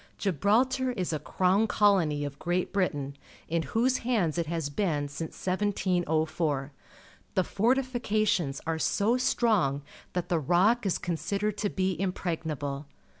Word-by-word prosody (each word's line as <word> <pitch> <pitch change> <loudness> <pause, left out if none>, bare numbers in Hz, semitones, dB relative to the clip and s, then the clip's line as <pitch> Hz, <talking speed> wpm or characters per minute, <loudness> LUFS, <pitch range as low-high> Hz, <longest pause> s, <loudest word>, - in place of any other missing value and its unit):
Gibral 205 - +3
tar 260 0 -1
is 180 -6 -2
a 155 - -1
crown 185 +8 +2
colony 180 -10 +3
of 140 0 -7
Great 175 +1 -1
Britain, 145 -8 -1 0.3
in 165 0 0
whose 245 +9 +1
hands 200 -10 0
it 165 - -1
has 160 -3 -2
been 150 -4 0
since 150 +3 -6
1704. 170 -7 0 0.6
The 185 - +3
fortifications 215 - +1
are 165 0 -1
so 215 +8 +2
strong 215 - +2 0.3
that 180 -1 -2
the 170 - +1
Rock 190 - +3
is 185 - +1
considered 200 +4 -2
to 205 - 0
be 185 -3 -1
impregnable. 155 -6 -3
180 Hz, 135 wpm, -28 LUFS, 155-210 Hz, 0.6 s, Gibral